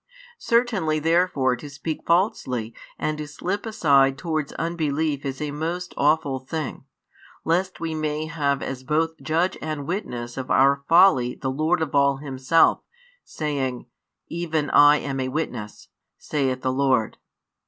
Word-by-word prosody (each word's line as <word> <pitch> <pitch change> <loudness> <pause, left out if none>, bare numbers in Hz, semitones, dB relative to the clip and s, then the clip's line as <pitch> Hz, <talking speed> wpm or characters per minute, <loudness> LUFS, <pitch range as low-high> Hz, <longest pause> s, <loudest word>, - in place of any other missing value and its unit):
Certainly 225 -10 +1
therefore 160 -5 +2
to 145 - -10
speak 150 +2 -6
falsely 130 - 0 0.2
and 155 0 -2
to 150 - -5
slip 185 +8 -4
aside 140 -10 +3
towards 155 -1 -2
unbelief 155 -3 -1
is 135 -1 -4
a 150 -1 -3
most 170 +4 -4
aweful 145 -2 +1
thing; 155 0 -5 0.6
lest 180 +3 0
we 165 -1 -3
may 155 0 -2
have 145 -4 -1
as 130 -1 -5
both 160 +4 +1
Judge 165 +4 0
and 155 -2 -4
Witness 125 - -4
of 130 -1 -5
our 140 +1 +4
folly 165 -8 +5
the 130 - -3
Lord 160 +5 +1
of 155 - -5
all 140 -1 +3
Himself, 135 +3 +2 0.4
saying: 140 -5 -3 0.4
Even 160 -3 -2
I 145 0 +7
am 135 -2 -4
a 130 - -1
Witness, 130 -7 -5 0.3
saith 130 -4 -2
the 130 - 0
Lord. 130 -5 +1
150 Hz, 145 wpm, -24 LUFS, 135-165 Hz, 0.6 s, I